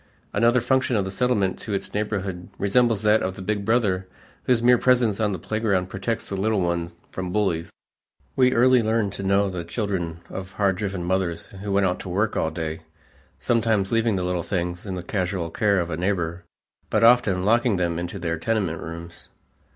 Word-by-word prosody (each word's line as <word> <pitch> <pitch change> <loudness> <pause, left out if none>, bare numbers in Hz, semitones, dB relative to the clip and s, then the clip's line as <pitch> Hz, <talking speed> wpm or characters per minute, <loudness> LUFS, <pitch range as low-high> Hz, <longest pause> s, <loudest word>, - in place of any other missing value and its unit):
Another 120 +1 +3
function 130 0 +1
of 100 -3 +1
the 95 - -4
Settlement 100 -5 +1
to 105 - -3
its - - -5
neighborhood 100 -4 -3
resembles 110 +1 +2
that 105 +1 +4
of 95 0 -2
the 95 - -8
big 105 +1 -1
brother 100 -4 +1 0.4
whose 120 -2 +2
mere 125 0 +6
presence 120 -5 +3
on 105 -2 +1
the 95 - -2
playground 100 -1 -1
protects 100 +4 -3
the 100 - -4
little 105 +2 +1
one 85 -1 -1 0.2
from 90 -1 -4
bullies. 90 -5 0 0.6
We 125 -1 +4
early 125 0 +5
learned 110 -2 0
to - - -6
know 100 +1 +2
the 90 -3 -4
children 85 -3 -3
of 95 0 -7
hard 100 -2 +1
driven 95 -3 -3
mothers 90 -2 -1
who 100 0 -4
went 100 0 +3
out 90 -1 0
to 95 - -7
work 105 +4 0
all 80 - +1
day, 80 0 -4 0.6
sometimes 110 -4 +1
leaving 115 -2 +2
the 90 - -1
little 90 -1 -1
things 90 +1 -3
in 95 - -3
the 90 - -5
casual 90 -3 -2
care 100 +2 +2
of 85 -1 -2
a 80 - -2
neighbor, 90 -2 -2 0.4
but 110 - +2
often 115 -6 +4
locking 115 +1 +3
them 85 -2 -1
into 85 0 -4
their 85 -2 -2
tenement 95 -5 -1
rooms. 85 +1 -8
100 Hz, 195 wpm, -24 LUFS, 90-110 Hz, 0.6 s, mere